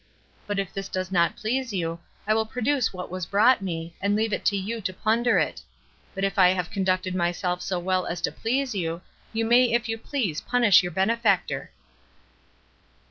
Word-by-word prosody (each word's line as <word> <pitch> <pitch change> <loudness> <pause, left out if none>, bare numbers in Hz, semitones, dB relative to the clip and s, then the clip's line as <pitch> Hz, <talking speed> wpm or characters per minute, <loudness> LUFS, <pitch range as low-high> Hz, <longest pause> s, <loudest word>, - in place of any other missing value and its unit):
But 205 -1 -2
if 195 -1 -2
this 195 0 -5
does 185 0 -3
not 170 -2 +2
please 240 +1 -2
you, 165 -3 -2 0.3
I 215 - +2
will 220 0 +1
produce 250 +2 0
what 180 -2 -7
was 185 -2 -4
brought 220 +4 +4
me, 165 -3 -4
and 200 +1 +1
leave 220 0 0
it - - -2
to 200 - +3
you 220 +4 -4
to 185 - -2
plunder 225 +5 +2
it; - - 0 0.5
but 195 - -3
if 195 0 0
I 185 - +8
have 180 -2 -1
conducted 185 -2 0
myself 180 0 -1
so 185 - -2
well 185 +1 0
as 175 - -3
to - - 0
please 255 +2 -1
you, 170 -2 -3 0.3
you 225 0 -1
may 240 +2 +5
if 235 0 +1
you 225 0 -3
please 220 - -2
punish 235 -7 +5
your 180 -1 -4
benefactor." 220 +7 +1
195 Hz, 190 wpm, -25 LUFS, 180-225 Hz, 0.5 s, I